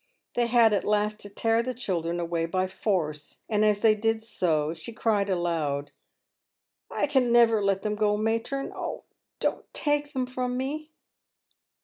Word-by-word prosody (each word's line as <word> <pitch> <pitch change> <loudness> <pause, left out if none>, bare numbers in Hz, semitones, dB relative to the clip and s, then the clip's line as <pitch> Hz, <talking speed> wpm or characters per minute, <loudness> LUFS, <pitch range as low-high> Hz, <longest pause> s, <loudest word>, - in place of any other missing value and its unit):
They 240 -1 +1
had 230 -2 +5
at 200 - +1
last 210 0 +1
to 205 - -8
tear 225 +3 +1
the 255 +1 -4
children 175 -7 -2
away 170 -1 -1
by 185 +2 0
force, 165 -6 -2
and 215 -1 +1
as 210 -1 +3
they 220 -1 +6
did 220 +1 0
so, 160 -8 0
she 170 +8 -8
cried 210 -3 +1
aloud, 160 -6 -1 0.5
" - - -64
I - - 0
can 265 -4 +2
never 230 -3 +5
let 195 -1 +1
them 210 - 0
go, 210 0 +1
matron; 230 +5 -1
oh! - - -5 0.4
don't - - -2
take 290 0 0
them 260 -2 0
from 250 0 -3
me." 300 +4 -3
215 Hz, 165 wpm, -27 LUFS, 185-235 Hz, 0.5 s, they